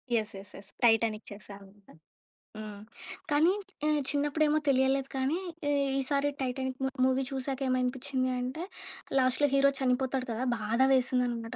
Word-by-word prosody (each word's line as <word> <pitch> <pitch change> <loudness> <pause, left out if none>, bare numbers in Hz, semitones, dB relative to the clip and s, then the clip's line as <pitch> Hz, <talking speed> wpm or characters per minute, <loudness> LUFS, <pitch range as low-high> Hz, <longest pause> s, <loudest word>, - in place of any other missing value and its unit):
Yes! 215 -2 -1
Yes! 195 - -11
Yes! 195 0 -9
Titanic 225 -1 +3
చూశానంటా. 200 -2 -12 0.6
హ్మ్. 210 -1 -7 0.5
కానీ, 315 +5 +5 0.4
ఆహ్, 300 -1 +2
చిన్నప్పుడే 295 +1 +1
ఏమో 310 +1 +3
తెలియలేదు 265 0 +2
కానీ, 265 +6 0 0.3
ఈ - - +2 0.3
ఈసారి 280 +1 +1
టైటానిక్ 260 0 -2
మూ - - +2 0.2
మూవీ 260 +1 +2
చూసాక 270 0 -3
ఏమనిపించింది 255 +1 0
అంటే, 255 +7 -4 0.5
లాస్ట్‌లో 260 +3 +3
హీరో 275 0 +5
చనిపోతాడు 260 0 0
కదా! 230 +3 -2
బాధ 220 +2 -2
వేసింది 255 -1 +2
అన్నమాట. 230 0 -4
255 Hz, 140 wpm, -30 LUFS, 230-275 Hz, 0.6 s, కానీ